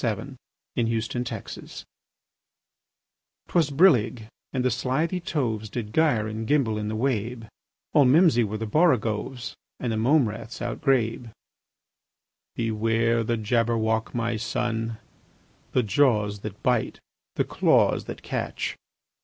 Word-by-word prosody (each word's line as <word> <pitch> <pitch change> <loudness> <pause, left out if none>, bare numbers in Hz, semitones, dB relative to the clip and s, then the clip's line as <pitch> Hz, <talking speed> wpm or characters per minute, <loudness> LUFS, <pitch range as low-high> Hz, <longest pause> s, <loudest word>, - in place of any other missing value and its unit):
Lewis 115 -1 -3
Carroll 120 +1 -2
Jabberwocky 115 -4 -7 1.7
'TWAS 165 -4 +2
brillig, 135 - +3 0.2
and 130 -2 -1
the 130 - +3
slithy 135 - 0
toves 120 - -2
Did 110 -1 -5
gyre 145 -10 +2
and 110 +1 -4
gimble 125 -8 +2
in 105 - -3
the 110 - -2
wabe: 115 -1 -1 0.5
All 145 - +6
mimsy 135 -2 +5
were 110 0 -3
the 110 - -3
borogoves, 120 -3 +1 0.3
And 120 - -2
the 110 - -1
mome 130 +3 +4
raths 110 +2 -7
outgrabe. 120 -2 0 1.3
"Beware 115 +1 +1
the 115 +1 0
Jabberwock, 110 0 0
my 115 -1 -1
son! 115 +1 -2 0.8
The 125 - +3
jaws 105 -2 +2
that 105 0 -8
bite, 125 -3 +1 0.4
the - - +2
claws - - +2
that - - -8
catch! - - -3
115 Hz, 120 wpm, -25 LUFS, 110-130 Hz, 1.7 s, All